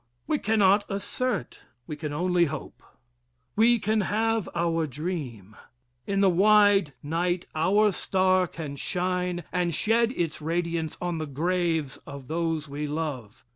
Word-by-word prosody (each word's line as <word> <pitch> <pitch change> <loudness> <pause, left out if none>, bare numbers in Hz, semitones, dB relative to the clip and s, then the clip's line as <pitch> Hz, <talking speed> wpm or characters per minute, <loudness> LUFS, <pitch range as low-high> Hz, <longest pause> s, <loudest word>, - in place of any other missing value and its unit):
We 300 - 0
cannot 205 -1 +3
assert, 200 - -3 0.3
we 150 - -5
can 150 0 -5
only 175 +3 +2
hope. 155 0 -7 0.7
We 235 +3 +5
can 215 0 +1
have 225 +1 0
our 165 -1 0
dream. 130 - -5 0.5
In 195 0 +1
the 195 - +5
wide 205 -3 +4
night 175 +4 -1
our 205 +7 +3
star 185 0 +2
can 150 -4 -7
shine 180 +1 -1
and 175 -3 0
shed 230 +4 +2
its 165 - -2
radiance 165 0 -2
on 175 -2 -2
the 155 - -3
graves 165 0 -1
of 140 -2 -9
those 165 -1 -1
we 145 +2 -4
love. 145 -9 -5
175 Hz, 135 wpm, -26 LUFS, 155-195 Hz, 0.7 s, We